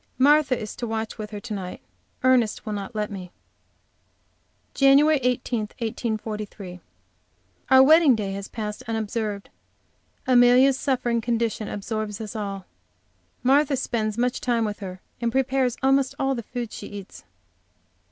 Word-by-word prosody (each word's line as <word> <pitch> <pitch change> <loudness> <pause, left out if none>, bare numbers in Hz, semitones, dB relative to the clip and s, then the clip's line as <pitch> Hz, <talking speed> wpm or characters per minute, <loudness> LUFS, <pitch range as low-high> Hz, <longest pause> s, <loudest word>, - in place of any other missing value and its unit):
Martha 280 -1 +4
is 215 - -6
to 240 - -4
watch 220 0 -4
with 215 -1 -5
her 210 -1 -6
to 220 +1 -7
night. 185 -3 -5 0.4
Ernest 250 -4 +2
will 215 - -3
not 205 +3 -6
let 210 -1 -2
me. 185 -3 -7 1.4
JAN. 275 0 +6
18, 250 -5 +1
1843. 215 -4 -5 0.9
Our 265 0 +8
wedding 310 -2 +6
day 205 -3 -3
has 195 0 -5
passed 210 -2 -5
unobserved. 215 -2 -3 0.7
Amelia's 255 +2 +5
suffering 240 -3 0
condition 230 -2 -1
absorbs 210 0 -4
us 220 -1 -7
all. 200 -3 -4 0.8
Martha 275 +2 +3
spends 215 -3 -2
much 245 +1 0
time 235 -2 +1
with 210 -1 -4
her, 185 -2 -7 0.2
and 235 -1 0
prepares 265 -1 +1
almost 270 0 +3
all 270 0 +1
the 240 - -3
food 235 0 -6
she - - -8
eats. 200 -2 -10
230 Hz, 140 wpm, -24 LUFS, 210-255 Hz, 1.4 s, Our